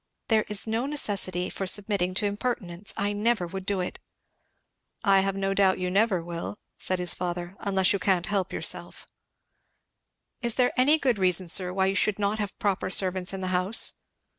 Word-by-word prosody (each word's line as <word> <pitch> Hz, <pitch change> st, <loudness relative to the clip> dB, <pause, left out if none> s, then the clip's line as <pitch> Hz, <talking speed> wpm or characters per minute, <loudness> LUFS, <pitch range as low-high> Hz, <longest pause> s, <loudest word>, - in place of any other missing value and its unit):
"There 220 Hz, -2 st, +3 dB
is 210 Hz, -1 st, +2 dB
no 225 Hz, +4 st, -1 dB
necessity 195 Hz, -10 st, 0 dB
for 195 Hz, -, -4 dB
submitting 195 Hz, -2 st, 0 dB
to 205 Hz, -, 0 dB
impertinence. 200 Hz, -3 st, -3 dB
I 205 Hz, +1 st, -1 dB
never 210 Hz, -2 st, +1 dB
would 190 Hz, +2 st, -7 dB
do 200 Hz, -2 st, 0 dB
it." 180 Hz, -, -5 dB, 1.0 s
"I 195 Hz, -2 st, +5 dB
have 195 Hz, 0 st, 0 dB
no 195 Hz, 0 st, -1 dB
doubt 195 Hz, -1 st, +3 dB
you 180 Hz, -1 st, -2 dB
never 195 Hz, -3 st, +2 dB
will," 170 Hz, +4 st, -6 dB, 0.2 s
said 185 Hz, -, +1 dB
his 180 Hz, -2 st, +2 dB
father. 175 Hz, 0 st, -4 dB
"Unless 190 Hz, -1 st, +2 dB
you 200 Hz, -, -1 dB
can't 180 Hz, -1 st, +1 dB
help 195 Hz, -2 st, -1 dB
yourself." -, -, -2 dB, 1.4 s
"Is 235 Hz, -2 st, 0 dB
there 250 Hz, -1 st, +2 dB
any 285 Hz, +5 st, +5 dB
good 255 Hz, -8 st, 0 dB
reason, 185 Hz, -1 st, +3 dB
sir, 180 Hz, +1 st, +1 dB
why 190 Hz, +1 st, +1 dB
you 190 Hz, -, +1 dB
should 205 Hz, 0 st, +1 dB
not 205 Hz, +1 st, -1 dB
have 205 Hz, -2 st, -4 dB
proper 200 Hz, -3 st, -1 dB
servants 185 Hz, -1 st, +2 dB
in 195 Hz, -1 st, -5 dB
the 185 Hz, -, -2 dB
house?" 185 Hz, +5 st, +2 dB
195 Hz, 185 wpm, -26 LUFS, 185-210 Hz, 1.4 s, I